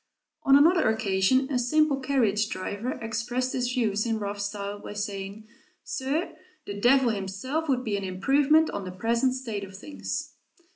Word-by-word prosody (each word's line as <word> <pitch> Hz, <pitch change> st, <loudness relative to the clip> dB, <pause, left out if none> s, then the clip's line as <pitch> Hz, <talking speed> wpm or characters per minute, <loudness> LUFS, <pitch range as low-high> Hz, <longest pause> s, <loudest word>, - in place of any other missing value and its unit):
On 275 Hz, -, +5 dB
another 320 Hz, 0 st, +5 dB
occasion 220 Hz, +4 st, +2 dB
a 255 Hz, -, +1 dB
simple 285 Hz, +3 st, +2 dB
carriage 225 Hz, -6 st, +1 dB
driver 205 Hz, +6 st, -3 dB
expressed 240 Hz, +2 st, -2 dB
his 250 Hz, -1 st, -1 dB
views 215 Hz, -5 st, +1 dB
in 225 Hz, -1 st, 0 dB
rough 205 Hz, -1 st, -4 dB
style, 200 Hz, 0 st, -4 dB
by 205 Hz, -, -8 dB
saying, 205 Hz, +1 st, -5 dB, 0.4 s
"Sir, 285 Hz, +6 st, -2 dB, 0.3 s
the 200 Hz, -, -5 dB
Devil 245 Hz, +5 st, +4 dB
himself 220 Hz, +11 st, -3 dB
would 255 Hz, -2 st, +1 dB
be 210 Hz, -4 st, -1 dB
an 200 Hz, -, -4 dB
improvement 275 Hz, +12 st, +3 dB
on 200 Hz, -, -4 dB
the 185 Hz, -, -6 dB
present 230 Hz, +7 st, +1 dB
state 225 Hz, -6 st, -4 dB
of 190 Hz, -1 st, -9 dB
things." 290 Hz, +9 st, -5 dB
225 Hz, 160 wpm, -27 LUFS, 200-265 Hz, 0.4 s, On